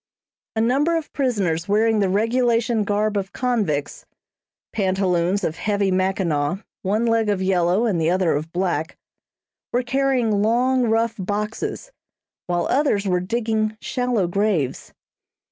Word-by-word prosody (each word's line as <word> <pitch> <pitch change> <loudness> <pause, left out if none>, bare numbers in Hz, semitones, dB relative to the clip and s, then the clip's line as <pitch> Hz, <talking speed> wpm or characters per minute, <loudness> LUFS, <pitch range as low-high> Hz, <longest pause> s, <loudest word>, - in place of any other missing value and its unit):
A 220 - +1
number 285 +8 +2
of 320 - -6
prisoners 195 - 0
wearing 220 +2 +2
the 195 -2 +2
regulation 230 +2 +1
garb 210 +1 0
of 195 -1 -4
convicts, 210 - -1 0.7
pantaloons 190 -1 +1
of 160 - -2
heavy 200 -2 0
mackinaw, 185 -2 0 0.2
one 210 +4 0
leg 230 -2 +2
of 200 -2 +1
yellow 185 +2 +2
and 190 -8 0
the 160 - +2
other 185 -1 +2
of 155 +3 -4
black, 175 -3 -2 0.7
were 245 +1 +1
carrying 250 -5 +1
long, 250 +4 +2
rough 225 0 +1
boxes, 210 - -3 0.6
while 175 -1 0
others 255 -8 +1
were 180 -1 +2
digging 220 +2 -1
shallow 245 -6 -1
graves. 175 -7 -1
210 Hz, 130 wpm, -22 LUFS, 185-230 Hz, 0.7 s, number